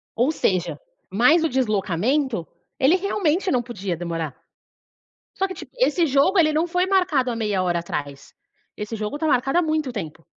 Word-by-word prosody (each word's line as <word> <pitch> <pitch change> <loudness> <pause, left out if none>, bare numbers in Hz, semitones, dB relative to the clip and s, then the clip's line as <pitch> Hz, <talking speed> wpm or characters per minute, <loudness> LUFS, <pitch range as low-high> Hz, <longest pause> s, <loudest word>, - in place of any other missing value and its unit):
Ou 250 +7 +2
seja, 185 - -1 0.3
mais 275 - +4
o 325 - +2
deslocamento, 220 - 0 0.3
ele 275 +6 +5
realmente 375 -2 0
não 250 - +2
podia 200 -7 -4
demorar, 165 -3 -4 1.0
só 385 - 0
que, 375 - -7
tip - - -10
esse 345 -8 +3
jogo, 285 +8 +3
ele 310 -2 +4
não 315 +3 +1
foi 360 +1 0
marcado 360 -10 +2
há 235 - -3
meia 210 -4 0
hora 175 -1 0
atrás, 145 -4 -6 0.4
esse 210 +2 -5
jogo 215 +7 -4
tá 320 - -1
marcado 270 +2 +2
há - - +4
muito 310 -5 -1
tempo. 165 -6 -7
255 Hz, 175 wpm, -23 LUFS, 195-320 Hz, 1.0 s, ele